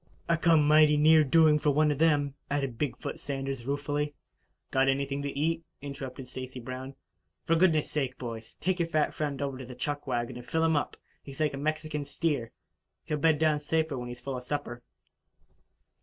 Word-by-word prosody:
"I 170 - +3
come 165 -3 +4
mighty 150 0 +6
near 155 +1 +6
doing 150 +1 +5
for 150 - +2
one 150 +1 +3
of 145 - -2
them," 145 -3 +3 0.2
added 135 -5 -2
Big 145 -4 -1
foot - - -6
Sanders 135 -3 -4
ruefully. 145 +1 -2 0.6
"Got 135 0 +3
anything 140 +1 0
to 140 -1 -4
eat?" 165 +3 0 0.2
interrupted 135 -2 -7
Stacy 130 0 -7
Brown. 130 +2 -7 0.5
"For 165 - +3
goodness' 165 -3 +3
sake, 135 -4 -1
boys, 115 -3 -7
take 185 0 0
your 170 - +1
fat 155 -2 +1
friend 145 -3 -3
over 135 -2 -3
to 130 - -7
the 125 - -9
chuck 145 +3 -3
wagon 120 -1 -2
and 120 - -9
fill 160 0 +1
him 160 -1 +3
up. 145 - -1 0.2
He's 140 +2 -10
like 155 -2 +1
a - - -4
Mexican 155 0 -2
steer 140 -5 -1 0.5
he'll 150 - -2
bed 160 +1 +4
down 155 -1 +2
safer 160 0 0
when 125 -1 -5
he's 120 0 -7
full 135 +2 -5
of 125 - -7
supper." 125 -3 -4
145 Hz, 195 wpm, -29 LUFS, 135-155 Hz, 0.6 s, mighty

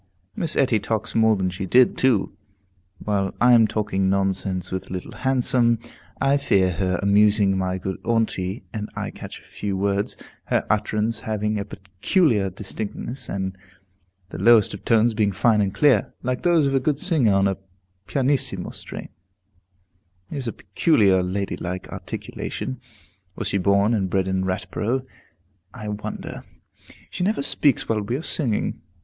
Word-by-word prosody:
Miss 160 -2 -1
Etty 125 -5 +3
talks 110 0 -2
more 110 -1 +4
than 95 -2 -1
she 95 +2 -5
did, 125 +5 +5
too. 125 -7 +1 0.6
While 100 -2 -1
I 120 0 +6
am 115 -2 +6
talking 100 -3 0
nonsense 95 -1 0
with 95 0 -4
Little 90 -1 -5
Handsome, 125 -2 +2 0.4
I 140 +1 +3
hear 95 -9 +2
her 90 +1 -1
amusing 100 0 +4
my 95 0 -1
good 95 0 -5
aunty, 110 -3 -1
and 105 -2 -4
I - - -4
catch - - -9
a - - -22
few 100 -2 -4
words, 100 +1 -1 0.3
her - - 0
utterance 105 +1 0
having 105 -2 -2
a 100 - -3
peculiar 100 - 0
distinctness, 105 +6 -5
and 95 -1 -3 0.7
the - - -7
lowest 115 -4 +5
tones 115 0 +4
being 105 -2 +1
fine 105 +3 +3
and 100 -1 0
clear, 130 -3 +3
like 125 0 -1
those 170 -4 +3
of 135 - 0
a 135 - +3
good 140 +2 0
singer 145 - +2
on 100 0 +3
a 95 - -1 0.5
pianissimo 135 0 0
strain. - - -7 1.2
It - - -4
is 130 -3 -4
a - - -1
peculiarly 95 - +2
ladylike 95 -1 -3
articulation; 65 - -6 0.5
was - - -2
she 100 - 0
born 100 +4 +3
and 95 -4 0
bred 95 0 0
in 95 0 0
Ratborough, 110 +7 -2 0.7
I 105 -4 -6
wonder? 105 +1 -6 0.7
She - - -3
never 200 -6 0
speaks 140 -2 +2
while 110 -2 0
we 105 +4 -2
are 150 - -4
singing. 125 -12 -1
105 Hz, 155 wpm, -23 LUFS, 95-120 Hz, 1.2 s, I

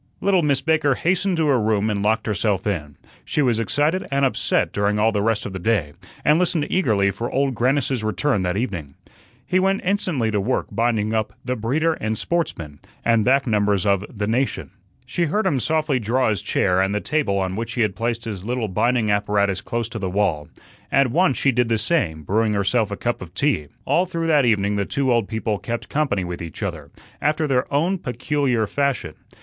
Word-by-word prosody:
Little 190 -2 +3
Miss 145 -4 +1
Baker 155 -4 +2
hastened 180 +3 0
to 160 - +2
her 135 -5 +3
room 105 -1 +1
and 100 -1 -1
locked 110 +2 +1
herself 105 -2 0
in. 75 -8 -3 0.3
She 150 - 0
was 120 -4 +2
excited 150 +10 0
and 140 0 +2
upset 130 - +1
during 100 +1 +1
all 110 +2 +3
the 105 -2 0
rest 110 0 0
of 100 - -5
the 95 - -4
day, 90 -7 0 0.3
and 150 +2 +5
listened 170 -4 +1
eagerly 105 - +2
for 115 +5 -4
Old 135 0 +1
Grannis's 130 -1 0
return 110 +1 0
that 90 +1 -1
evening. 90 - -4 0.5
He 185 - +2
went 195 +1 +1
instantly 180 - 0
to 105 -1 0
work 125 +6 0
binding 115 -2 0
up 110 -1 -1
"The 125 0 -1
Breeder 145 +9 0
and 110 -7 -3
Sportsman," 85 - -3 0.3
and 115 -2 +3
back 135 +3 +3
numbers 105 -4 +1
of 100 -1 +2
the 105 -2 -4
"Nation." 125 +5 -1 0.3
She 170 - -1
heard 210 +8 0
him 135 - +2
softly 155 -1 0
draw 120 +3 +1
his 105 -5 -1
chair 90 +1 +1
and 95 +2 0
the - - +1
table 145 -7 0
on 95 -1 -1
which 115 +2 -4
he 120 - -1
had 105 -3 +1
placed 115 +1 -2
his 100 -5 -5
little 120 0 -2
binding 110 +2 +1
apparatus 100 -1 +1
close 115 -2 -3
to 115 - -6
the 95 -2 -2
wall. 90 -6 0 0.4
At 135 -3 +3
once 175 -1 +2
she 140 - +3
did 125 -1 +1
the 115 - +2
same, 105 - 0
brewing 110 +6 +1
herself 100 +2 +1
a 100 - -4
cup 120 0 -2
of 90 -1 -10
tea. 115 - +1 0.2
All 180 +2 +2
through 165 -2 -3
that 150 -5 +4
evening 105 -3 +2
the 100 - 0
two 135 +1 0
old 115 -4 +1
people 110 -2 -2
"kept 120 0 -5
company" 140 -11 0
with 90 -1 -5
each 85 +5 -7
other, 80 -7 -4 0.3
after 155 +2 +1
their 130 -3 0
own 170 +7 +1
peculiar 125 -3 0
fashion. 135 - -1
115 Hz, 210 wpm, -22 LUFS, 100-140 Hz, 0.5 s, and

